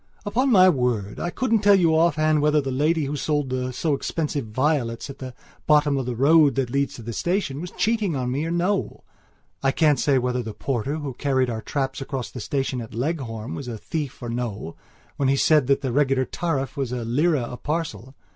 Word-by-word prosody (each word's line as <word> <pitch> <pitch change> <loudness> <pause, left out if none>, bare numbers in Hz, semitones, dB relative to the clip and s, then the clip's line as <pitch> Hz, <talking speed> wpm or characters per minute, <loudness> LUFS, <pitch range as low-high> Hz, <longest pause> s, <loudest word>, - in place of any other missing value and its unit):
Upon 255 +6 +1
my 185 -4 +7
word, 125 - 0
I 175 - -2
couldn't 230 +3 +1
tell 205 -1 +6
you 170 -4 +3
offhand 155 -2 +3
whether 150 0 +3
the 135 -2 -2
lady 150 +4 +1
who 140 +2 -3
sold 145 -2 -1
the 130 0 -2
so 145 +5 -1
expensive 145 -3 -2
violets 130 +1 -1
at 135 - -14
the 130 -1 -7 0.3
bottom 150 -1 +4
of 135 -2 -2
the 125 - -2
road 145 +2 +5
that 130 -3 -1
leads 140 +1 0
to 120 - -10
the 115 +1 -5
station, 170 - -1
was 175 - -5
cheating 215 -4 0 0.2
me 140 +5 -1
or - - -3
no; 180 +4 -1 0.6
I 135 - +2
can't 150 -3 +3
say 140 0 +3
whether 125 0 0
the 110 -3 -7
porter 135 +4 -2
who 145 -4 -4
carried 130 -2 0
our 110 -1 -4
traps 135 +2 -3
across 135 -2 -4
the 125 - -7
station 130 +2 -2
at 115 0 -9
Leghorn 120 -4 -3
was 140 - -6
a 115 -2 -5
thief 145 +1 -5
or 120 - -4
no 115 -8 -4 0.4
when 135 -2 +1
he 140 - +3
said 150 -2 +4
that 140 0 +2
the 130 - -2
regular 135 0 +2
tariff 140 -5 -2
was 135 -4 -2
a 125 -2 -3
lira 145 +4 +2
a 120 - -6
parcel. 150 -4 -4
140 Hz, 210 wpm, -24 LUFS, 125-155 Hz, 0.6 s, my